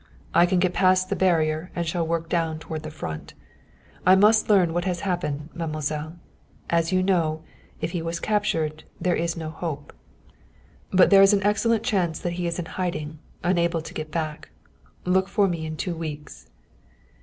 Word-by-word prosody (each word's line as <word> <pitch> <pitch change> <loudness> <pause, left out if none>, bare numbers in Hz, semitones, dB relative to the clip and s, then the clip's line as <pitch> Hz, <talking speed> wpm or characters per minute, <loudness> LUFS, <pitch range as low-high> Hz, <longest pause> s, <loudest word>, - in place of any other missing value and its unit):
I 175 +1 +5
can 185 +1 +1
get 180 0 +2
past 185 0 +3
the - - +2
barrier 160 -2 +1
and 170 - -1
shall 165 0 -1
work 165 0 -1
down 165 -2 0
toward 155 0 -6
the 155 - -6
Front. 80 - -7 0.7
I 185 +1 +7
must 215 +3 +4
learn 185 -5 +4
what 175 +1 -1
has 180 -2 -1
happened, 165 -6 -2
mademoiselle. 155 -1 -3 0.5
As 170 0 +2
you 185 0 +2
know, 165 -5 +1 0.4
if - - -2
he 175 - -2
was 165 +1 -3
captured, 165 -8 -1 0.2
there 180 - +1
is 170 0 -1
no 160 -1 -5
hope. 155 -3 -5 1.0
But 185 +1 +5
there 195 -1 +8
is 195 +1 +7
an 200 -1 +2
excellent 220 +2 +2
chance 185 -9 0
that 175 - -3
he 175 0 -2
is 170 - -2
in 175 - -3
hiding, 160 -4 -4 0.2
unable 170 -2 +1
to - - -9
get 155 0 -5
back. 155 -1 -4 0.6
Look 190 +1 +2
for 200 0 +2
me 165 -3 -3
in 155 0 -5
two 175 +1 -3
weeks." 150 - -7
170 Hz, 180 wpm, -25 LUFS, 155-185 Hz, 1.0 s, there